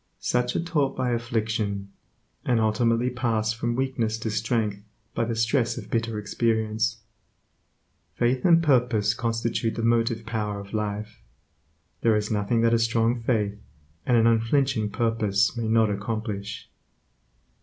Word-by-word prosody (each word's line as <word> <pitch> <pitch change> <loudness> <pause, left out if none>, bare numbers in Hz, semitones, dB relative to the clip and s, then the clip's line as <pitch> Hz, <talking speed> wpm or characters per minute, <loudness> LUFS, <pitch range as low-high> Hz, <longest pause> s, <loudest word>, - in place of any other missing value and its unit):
Such 125 0 0
are - - 0
taught 145 -6 0
by 125 -1 0
affliction, 110 -4 -2 0.5
and 120 -2 +2
ultimately 115 +2 +2
pass 115 -3 0
from 120 +1 -2
weakness 120 -4 -1
to 110 - -2
strength 110 -1 -1 0.3
by 115 - 0
the 115 0 -2
stress 115 +2 +1
of - - -8
bitter 115 -1 -1
experience. 110 +1 0 1.2
Faith 125 +1 +1
and 170 -2 +5
purpose 120 -8 +3
constitute 115 0 -1
the 115 - -3
motive 115 -1 +1
power 105 -3 -3
of 100 +1 -11
life. 105 0 -4 0.8
There 115 -2 +3
is 105 0 -1
nothing 110 +2 +1
that 115 0 +3
a 115 - +4
strong 115 +1 +1
faith 105 -4 -1 0.4
and 120 - +3
an 115 - +4
unflinching 115 0 +2
purpose 115 -2 +1
may 115 -2 -2
not 110 -1 +3
accomplish. 105 0 -4
115 Hz, 140 wpm, -25 LUFS, 110-120 Hz, 1.2 s, and